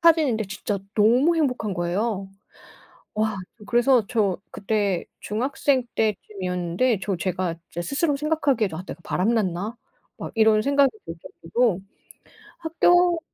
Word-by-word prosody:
타지는데 310 -10 +4
진짜 195 +1 -3 0.2
너무 245 +10 +4
행복한 250 - 0
거예요. 195 +3 -1 0.9
와 215 -1 0 0.2
저 210 - -13
그래서 240 0 +3
저 210 -6 +1
그때 200 -3 0 0.2
중학생 260 +3 0
때쯤이었는데 195 0 0
저 195 -2 -1
제가 180 -1 -2
진짜 175 - -5
스스로 285 - +1
생각하기에도 280 - 0
'아 180 - -5
내가 170 - -8
바람났나?' 205 +1 0 0.4
막 - - -7
이런 220 -1 +4
생각이 280 0 +4
들 165 - -6 0.3
정도로 210 +2 +1 0.8
학교 350 +1 +3
220 Hz, 290 characters per minute, -24 LUFS, 190-270 Hz, 0.9 s, 타지는데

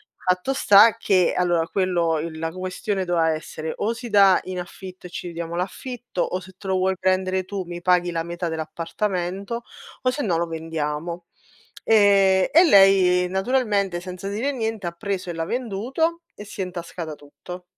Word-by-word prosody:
Fatto 185 +8 0
sta 215 -1 +6
che 185 -5 +2
allora 175 -2 +1
quello 175 -4 0
il 160 0 -5
la 165 0 -2
questione 185 +2 -3
doveva 170 -2 +2
essere: 155 0 -5
o 220 +3 0
si 235 0 -8
dà 200 -3 +6
in 185 -1 -5
affitto 180 +1 -9
e - - -14
ci - - -6
dividiamo 170 0 -5
l'affitto, 235 +3 -4
o 185 - -1
se 190 0 -14
te 200 - -10
lo 190 - +1
vuoi 190 +1 +1
prendere 185 0 +1
tu 195 -1 -4
mi 175 0 -7
paghi 180 -1 +2
la 165 -1 -2
metà 170 +1 -4
dell'appartamento, 180 +6 -3 0.4
o 255 - +3
sennò 235 - -1
lo 170 - 0
vendiamo. 165 +1 -4 0.6
E 195 -3 +4
e 335 +4 +8
lei 190 - +5
naturalmente, 200 -3 0
senza 185 +1 -7
dire 235 +8 -1
niente, 225 -6 -3
ha - - -2
preso 190 -1 -4
e - - -6
l'ha 165 0 -3
venduto 255 - -2
e 210 - -9
si 200 - -7
è 185 - 0
intascata 170 -3 -6
tutto. 180 +5 -11
185 Hz, 175 wpm, -23 LUFS, 170-200 Hz, 0.6 s, e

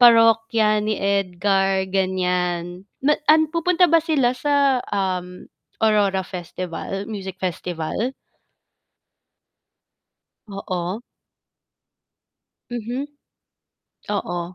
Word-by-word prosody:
Parokya 225 -2 +5
ni 215 0 -1
Edgar 195 0 +1
ganyan 180 -1 -1 0.2
na 300 +1 +3
ah, 310 - +9 0.2
pupunta 355 +1 +3
ba 330 -1 +5
sila 290 -7 +2
sa, 280 -1 +2
um, 180 -2 -2 0.4
Aurora 205 -3 +3
Festival, 185 +1 -5
Music 195 -4 -6
Festival? 180 +6 -3 2.4
Oo. 185 0 -4 1.7
Mhm, 240 +2 -3 1.2
oo. 175 -3 -2
195 Hz, 75 wpm, -22 LUFS, 185-235 Hz, 2.4 s, ah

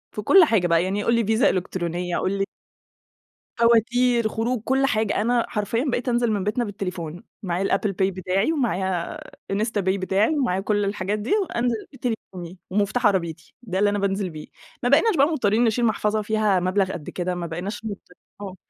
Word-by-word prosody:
في 210 - -3
كل 370 - +7
حاجة 215 - +2
بقى 165 0 +3
يعني 200 +3 -1
قُل 235 - +2
لي 230 - +1
فيزا 220 +3 +3
إلكترونية 175 -1 -2
قُل 190 - -1
لي 195 0 0 1.1
فواتير، 235 +1 +3
خروج، 225 +2 -2
كل 265 +2 +2
حاجة، 220 -5 0
أنا 235 +1 +1
حرفيًا 210 +3 -1
بقيت 245 +1 -1
أنزل 240 -1 +1
من 200 -3 -1
بيتنا 215 +4 0
بالتليفون، 180 -3 -5 0.2
معايا 180 0 -1
الApple 210 - -2
Pay 190 0 +1
بتاعي 190 - 0
ومعايا 190 - -1 0.3
إنستا 210 +1 0
باي 190 +1 0
بتاعي، 195 +4 +1
ومعايا 240 -10 0
كل 205 0 0
الحاجات 200 +1 -2
دي، 215 +5 -4
وأنزل 235 - -2
بتليفوني 190 -8 -5
ومفتاح 205 +5 0
عربيتي، 175 -6 0
ده 190 -6 -3
اللي 205 - +4
أنا 205 0 -1
بانزل 195 -1 -1
بيه. 155 -2 -9 0.4
ما 245 - +2
بقيناش 325 - +4
بقى 280 - +5
مضطرين 240 -8 +1
نشيل 235 +1 +2
محفظة 215 -1 +1
فيها 210 -3 +1
مبلغ 185 +1 +1
قد 155 -4 -7
كده، 180 0 -3
ما 175 -1 -4
بقيناش 190 +7 -5
مضطرين 205 -3 -4 0.4
آه، 195 -2 -6
205 Hz, 185 wpm, -23 LUFS, 185-230 Hz, 1.1 s, كل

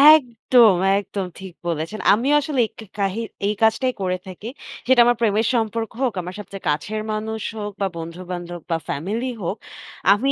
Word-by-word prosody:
একদম, 240 -5 +4 0.2
একদম। 200 -1 -4
ঠিক 190 -2 -9
বলেছেন। 165 +6 -2
আমি 235 +7 +1
আসলে 285 -2 -2
এই - - -8
ক - - -45
কে 220 - -8
কাহি 200 +3 0 0.3
এই 210 - +2
কাজটাই 250 +3 +3
করে 185 -1 0
থাকি। 190 +4 -8 0.4
সেটা 260 -2 +5
আমার 240 -1 +3
প্রেমের 215 0 +3
সম্পর্ক 225 -1 0
হোক, 255 -4 +2
আমার 180 +1 -7
সবচেয়ে 195 -2 -9
কাছের 210 +9 -1
মানুষ 220 +1 -3 0.2
হোক, 205 -1 -4
বা 195 - +3
বন্ধু-বান্ধব 175 +1 -6
বা 165 - +3
ফ্যামিলি 220 - -2
হোক। 190 +6 -2 0.6
আমি 265 +7 +1
210 Hz, 175 wpm, -22 LUFS, 185-230 Hz, 0.6 s, সেটা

